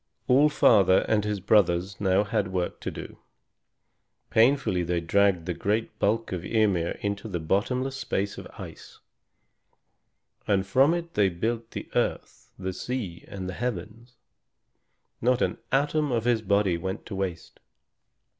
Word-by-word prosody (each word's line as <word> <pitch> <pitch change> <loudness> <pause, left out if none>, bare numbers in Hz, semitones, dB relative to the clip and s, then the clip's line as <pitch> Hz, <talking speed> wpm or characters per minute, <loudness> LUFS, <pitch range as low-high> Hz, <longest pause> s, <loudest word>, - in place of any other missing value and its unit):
All 140 +4 +5
Father 100 -10 +4
and 105 -2 +2
his 105 -1 -2
brothers 95 -1 +2
now 95 0 +3
had 100 -1 -1
work 90 -2 -3
to - - -4
do. - - -9 1.1
Painfully 115 -5 +3
they 85 0 0
dragged 95 0 +2
the 90 - -2
great 105 +6 -2
bulk 115 +3 0
of 90 -2 -3
Ymir 95 -5 +1
into 100 +1 -3
the 90 -5 -3
bottomless 125 +11 -1
space 100 -6 -2
of - - -9
ice, - - -10 1.5
and 100 -2 +2
from 135 - +4
it 170 -1 -5
they 100 -2 +3
built 110 +6 -3
the - - -7
earth, - - -2
the 95 -1 -4
sea, 105 -7 -5
and 95 -2 -6
the 95 - -4
heavens. 120 +1 -5 1.1
Not 125 +1 +2
an - - -2
atom 145 +2 +1
of 115 -2 0
his 120 -2 +2
body 100 -4 +1
went 95 +3 -5
to 100 - -6
waste. 95 -4 -5
100 Hz, 145 wpm, -26 LUFS, 95-120 Hz, 1.5 s, All